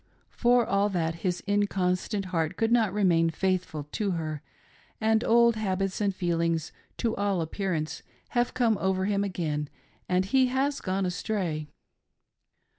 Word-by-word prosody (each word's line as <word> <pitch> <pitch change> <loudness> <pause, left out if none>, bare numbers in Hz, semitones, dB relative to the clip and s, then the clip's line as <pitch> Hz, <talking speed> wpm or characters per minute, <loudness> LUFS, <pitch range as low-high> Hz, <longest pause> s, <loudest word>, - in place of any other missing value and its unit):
For 240 -1 +3
all 200 0 +2
that, 165 -4 -1
his 180 -2 -1
incon 200 -3 +1
stant 200 +2 -4
heart 165 +1 0
could 225 0 +1
not 225 -5 +3
remain 175 -5 +3
faithful 180 -3 -1
to 205 -3 -1
her, 155 -3 -3 0.6
and 220 +1 +2
old 235 0 +4
habits 195 -2 -1
and 200 -1 +2
feelings, 170 -3 0 0.3
to 230 -2 0
all 200 -2 0
appearance, 165 -1 -2 0.3
have 240 0 0
come 230 -5 +2
over 190 0 0
him 200 0 +1
again, 155 -7 -2 0.4
and 185 +1 +2
he 260 +5 +3
has 270 +3 0
gone 190 0 -1
astray. 180 -5 -2
190 Hz, 145 wpm, -28 LUFS, 170-215 Hz, 0.6 s, old